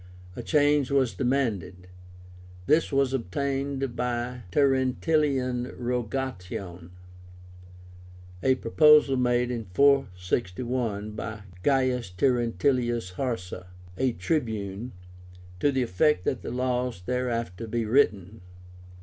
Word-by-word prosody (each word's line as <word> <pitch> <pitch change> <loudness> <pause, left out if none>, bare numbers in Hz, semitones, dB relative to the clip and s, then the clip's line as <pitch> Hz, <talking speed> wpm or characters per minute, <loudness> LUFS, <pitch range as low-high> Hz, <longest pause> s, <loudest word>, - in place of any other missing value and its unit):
A - - -5
change 145 -3 +2
was 135 -4 +2
demanded. 115 -9 -1 0.8
This 155 - +3
was 135 -1 +2
obtained 135 +3 -2
by 125 0 -2
the 90 - 0
TERENTILIAN 130 -1 +1
ROGATION, 110 -8 -4 1.5
a 130 0 +3
proposal 150 +3 +5
made 125 -1 +1
in 115 -2 -4
461 110 0 0
by 105 0 -6 0.2
Gaius 130 -3 +1
Terentilius 120 0 0
Harsa, 90 -5 -4 0.3
a 130 +3 0
Tribune, 110 - -3 0.7
to 145 - +3
the 130 -2 +1
effect 120 - +1
that 130 - -1
the - - -6
laws 125 -5 -2
thereafter 115 -4 -2
be 115 +1 -1
written. 110 -4 +1
125 Hz, 100 wpm, -27 LUFS, 105-135 Hz, 1.5 s, proposal